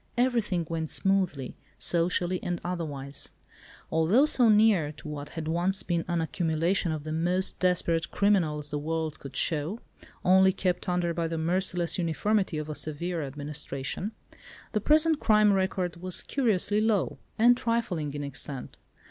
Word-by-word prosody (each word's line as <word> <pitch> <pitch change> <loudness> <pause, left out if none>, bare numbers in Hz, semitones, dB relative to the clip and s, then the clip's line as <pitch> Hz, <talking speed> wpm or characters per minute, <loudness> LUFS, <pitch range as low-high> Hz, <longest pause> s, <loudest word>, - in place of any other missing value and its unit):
Everything 230 -9 +1
went 160 -2 -3
smoothly, 185 -9 0 0.2
socially 175 +1 0
and 175 -1 -2
otherwise. 145 -6 -4 0.6
Although 165 - +4
so 250 -6 +4
near 210 -8 +4
to 155 - -12
what 145 -1 -6
had 160 -1 -3
once 175 +4 +1
been 170 -2 -1
an 175 -1 0
accumulation 165 +2 0
of 155 -2 -4
the 155 - -5
most 175 +4 0
desperate 170 -2 +1
criminals 160 -8 +1
the 145 - -1
world 160 0 -3
could 140 - -10
show, 160 +7 0 0.5
only 190 +1 +6
kept 180 0 -1
under 175 -1 0
by 165 0 -1
the 165 0 -3
merciless 175 +1 0
uniformity 180 +2 0
of 155 0 -4
a 155 - -4
severe 165 +3 -4
administration—the 145 +9 -6
present 310 +4 +4
crime 210 -2 +4
record 190 -2 -1
was 185 +1 -1
curiously 215 -5 +1
low, 215 -4 +1 0.2
and 240 +2 +6
trifling 230 -11 -1
in 145 - -3
extent. 135 -1 -6
175 Hz, 145 wpm, -28 LUFS, 155-195 Hz, 0.6 s, only